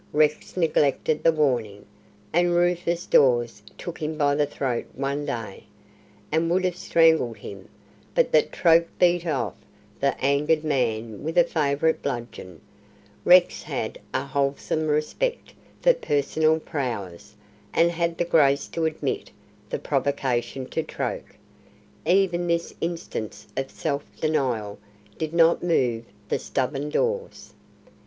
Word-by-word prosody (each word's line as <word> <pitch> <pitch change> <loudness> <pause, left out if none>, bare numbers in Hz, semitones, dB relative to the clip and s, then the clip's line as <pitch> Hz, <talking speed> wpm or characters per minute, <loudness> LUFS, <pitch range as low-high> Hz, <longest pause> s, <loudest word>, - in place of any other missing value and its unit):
Rex 150 +3 +1
neglected 155 -2 +1
the 165 - +5
warning, 120 -10 0 0.5
and 175 +1 +3
Rufus 175 0 +1
Dawes 120 -5 +3 0.2
took 175 - -7
him 155 0 -3
by 145 -2 +2
the 145 0 +1
throat 130 -5 -3
one 140 +2 -2
day, 110 -5 -5 0.7
and 160 +2 +1
would 185 +2 +2
have 180 -1 0
strangled 160 -9 +3
him, 100 -2 -10 0.5
but - - +3
that 155 - +3
Troke 170 -1 +4
beat 175 -1 +3
off 130 - -1 0.5
the 140 - 0
angered 145 +3 +2
man 115 -7 -1
with 165 +3 -3
a 175 - +8
favourite 155 -1 0
bludgeon. 120 - -6 0.6
Rex 180 0 +6
had - - -4
a - - -1
wholesome 140 +2 -1
respect 155 - -1 0.3
for - - +6
personal 155 - +1
prowess, 115 - -5 0.4
and 170 +1 +3
had 170 -1 -1
the 175 - 0
grace 145 -4 +3
to 165 -1 -2
admit 155 -1 -2 0.4
the - - -2
provocation 130 -2 -1
to 160 - -1
Troke. - - -5 0.7
Even 175 -1 +2
this 170 0 -1
instance 165 -10 -4
of 135 0 -2
self 145 -2 -3 0.2
denial 125 -10 -1 0.4
did 155 -1 -2
not 170 0 +4
move 125 -9 +1 0.2
the - - -1
stubborn 135 +2 -2
Dawes. 480 - -2
150 Hz, 130 wpm, -25 LUFS, 130-170 Hz, 0.7 s, a